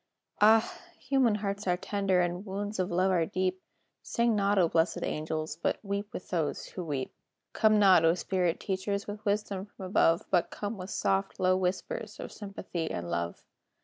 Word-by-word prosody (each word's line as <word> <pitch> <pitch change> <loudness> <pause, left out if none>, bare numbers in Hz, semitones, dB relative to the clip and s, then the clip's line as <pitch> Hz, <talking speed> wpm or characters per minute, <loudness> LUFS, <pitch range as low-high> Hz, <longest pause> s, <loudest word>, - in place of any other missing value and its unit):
Ah! 220 +1 +5 0.2
human 255 -4 +2
hearts 200 -1 -3
are 180 0 +2
tender, 195 -1 +1
And 175 +1 -1
wounds 205 +1 -4
of 185 - 0
love 185 +2 +2
are 170 -3 +2
deep: 185 -1 -1 0.4
Sing 235 -1 +1
not, 200 0 +2
O 180 -3 +5
blessed 165 +1 +1
angels! 155 0 -3
But - - +1
"weep 200 +1 -3
with - - -8
those 165 -5 -1
who 180 - -6
weep." 140 -5 -3 0.4
Come 215 -1 +4
not, 190 -5 +6
O 165 +1 +5
spirit 180 -2 0
teachers! 200 +1 -2
With 210 +1 -7
wisdom 200 -1 -1
from 195 - -10
above, 170 -3 +3
But 175 -3 +3
come 205 +2 -4
with 185 -1 -7
soft, 195 0 0
low 185 0 +4
whispers 185 - -3
Of - - -6
sympathy 190 -5 -5
and 85 0 -4
love. 85 0 -3
190 Hz, 180 wpm, -30 LUFS, 175-205 Hz, 0.4 s, not